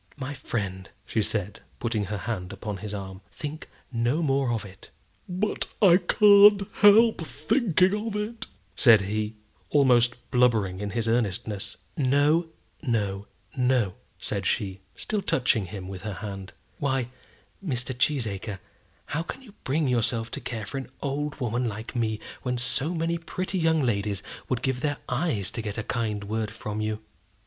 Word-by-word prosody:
"My 140 0 -4
friend," 95 -8 -4 0.2
she 110 - 0
said, 105 -1 -2 0.2
putting 110 -3 -1
her 105 +2 -3
hand 95 -3 -4
upon 100 +1 -5
his 105 +2 -6
arm, 95 -2 -6
"think 155 +2 -6 0.2
no 120 +7 +1
more 135 -3 +2
of 115 -3 -2
it." 95 -1 -13 0.4
"But 185 +4 -1
I 180 -4 +7
can't 200 +2 +7
help 215 +1 +7
thinking 185 - +2
of 215 - -3
it," 210 +2 -3 0.3
said 115 -4 +7
he, 105 +2 -2 0.3
almost 125 -4 +5 0.2
blubbering 110 -7 +3
in 105 0 -3
his 115 +2 -1
earnestness. 110 -2 -1 0.2
"No, 145 +3 +3 0.3
no, 105 -7 -1 0.3
no," 125 -6 +2 0.2
said - - -2
she, 95 -2 -1 0.2
still 215 -2 -2
touching 125 - +1
him 95 0 -7
with 95 -1 -7
her 105 0 -4
hand. 95 0 -7 0.3
"Why, 130 -4 0 0.5
Mr. 130 -6 -2
Cheesacre, 110 -7 0 0.5
how 150 +3 -2
can 260 +10 -7
you 215 -6 -15
bring 145 +2 +1
yourself 115 -2 +1
to - - -4
care 115 -3 -4
for 135 +7 -4
an 130 - -8
old 145 +1 -2
woman 120 0 0
like 110 +3 -6
me, 110 -2 0 0.2
when 125 -1 -1
so 135 +7 0
many 165 +1 0
pretty 185 +3 -3
young 160 -2 +3
ladies 100 -4 0 0.3
would 125 -2 -1
give 130 -2 0
their 145 +1 -1
eyes 125 - 0
to 115 - -3
get 105 -1 -4
a 110 - -2
kind 105 -3 -2
word 110 +1 -2
from 110 0 -5
you?" 110 0 -2
120 Hz, 160 wpm, -27 LUFS, 105-150 Hz, 0.5 s, I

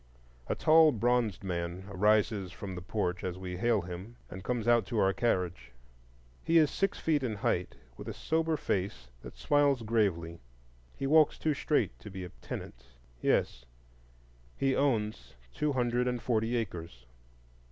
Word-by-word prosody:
A - - -1
tall 160 0 +6
bronzed 115 -3 +1
man 90 0 -3
rises 105 -1 +2
from 95 -2 -7
the 90 - -6
porch 90 -1 -2
as 90 -1 -3
we 90 -1 -5
hail 115 0 +2
him, 90 +6 -8 0.2
and 95 +1 -8
comes 120 -3 -2
out 120 -1 +5
to 115 - -3
our 95 -2 +3
carriage. 90 - -1 0.7
He 165 - +3
is 155 -3 +5
six 195 0 0
feet 155 -3 +1
in 120 -5 -2
height, 90 -3 -1 0.2
with - - -9
a - - -4
sober 160 0 0
face 90 - -2
that - - -11
smiles 145 -4 +2
gravely. 95 -7 0 0.6
He 135 - -3
walks 155 +1 +5
too 155 - 0
straight 150 +1 0
to 105 - -10
be 95 -1 -7
a 90 - -7
tenant,—yes, - - -3 0.9
he 135 -1 +1
owns 105 - -1 0.2
two 150 - 0
hundred 125 -1 +1
and 125 -1 -1
forty 115 0 0
acres. 85 - -5
105 Hz, 155 wpm, -31 LUFS, 90-125 Hz, 0.9 s, tall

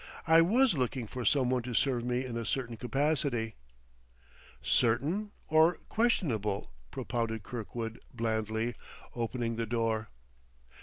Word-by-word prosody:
"I 165 0 +7
was 230 +7 +4
looking 130 -3 -1
for 125 +3 -5
some 130 +2 +3
one 130 -1 +2
to 120 0 -5
serve 125 -2 +2
me 125 +1 0
in 120 -2 -5
a 115 - -2
certain 120 0 -2
capacity 130 -2 0 0.6
" - - -26 0.2
"Certain 155 - +1 0.2
or 160 +2 +5
questionable?" 110 - 0 0.2
propounded 115 -3 -2
Kirkwood 115 0 -5
blandly, 110 0 -1 0.4
opening 115 -1 -2
the 115 -1 -1
door. 115 -1 0
120 Hz, 130 wpm, -31 LUFS, 115-140 Hz, 0.6 s, I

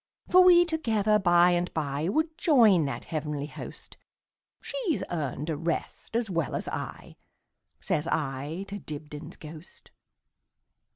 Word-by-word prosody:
For 370 +1 +7
we 350 -1 +7
together 220 - +1
by 175 -1 +5
and 175 0 0
byWould 160 - -1
join 225 - +5
that 140 - -4
heavenly 150 -2 -3
host; 150 - -10 0.6
She - - -8 0.2
's - - -4
earned 150 -3 -3
a - - -1
rest 165 +7 -4
as 235 -1 +1
well 165 -6 -2
as - - -3
I,"Says 155 +2 -6
I 150 +4 -2
to 205 +1 -6
Dibdin's 150 0 -8
ghost. 155 +2 -12
170 Hz, 125 wpm, -28 LUFS, 150-215 Hz, 0.6 s, For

